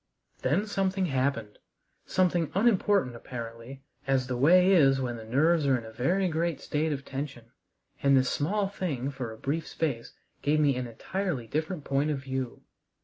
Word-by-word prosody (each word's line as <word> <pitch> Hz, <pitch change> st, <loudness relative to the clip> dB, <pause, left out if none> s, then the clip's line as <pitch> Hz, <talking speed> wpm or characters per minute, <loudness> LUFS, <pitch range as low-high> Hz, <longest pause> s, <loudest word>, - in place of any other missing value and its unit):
Then 160 Hz, +11 st, +1 dB
something 195 Hz, -2 st, 0 dB
happened, 130 Hz, -7 st, -1 dB, 0.5 s
something 175 Hz, -3 st, +2 dB
unimportant 200 Hz, -, +3 dB
apparently, 115 Hz, +2 st, -8 dB, 0.2 s
as 135 Hz, -2 st, +2 dB
the 125 Hz, 0 st, -3 dB
way 180 Hz, +9 st, +5 dB
is 135 Hz, -7 st, +5 dB
when 125 Hz, -2 st, -2 dB
the 115 Hz, -, -8 dB
nerves 145 Hz, +7 st, +2 dB
are 130 Hz, -2 st, +4 dB
in 115 Hz, -, -8 dB
a 110 Hz, -, -9 dB
very 175 Hz, +12 st, +1 dB
great 165 Hz, -2 st, -1 dB
state 155 Hz, +1 st, -1 dB
of 140 Hz, -2 st, -4 dB
tension, 135 Hz, -4 st, -6 dB, 0.5 s
and 140 Hz, -1 st, +5 dB
this 130 Hz, 0 st, +3 dB
small 195 Hz, +7 st, 0 dB
thing 145 Hz, -9 st, -3 dB
for 130 Hz, -4 st, -5 dB
a 110 Hz, -, -10 dB
brief 145 Hz, +7 st, -2 dB
space 140 Hz, -8 st, -3 dB, 0.3 s
gave 150 Hz, +1 st, +2 dB
me 145 Hz, -3 st, +3 dB
an 125 Hz, -1 st, -3 dB
entirely 150 Hz, -, -3 dB
different 155 Hz, -, -3 dB
point 140 Hz, +2 st, 0 dB
of 150 Hz, -, 0 dB
view. 130 Hz, -2 st, -5 dB
140 Hz, 170 wpm, -28 LUFS, 125-170 Hz, 0.5 s, way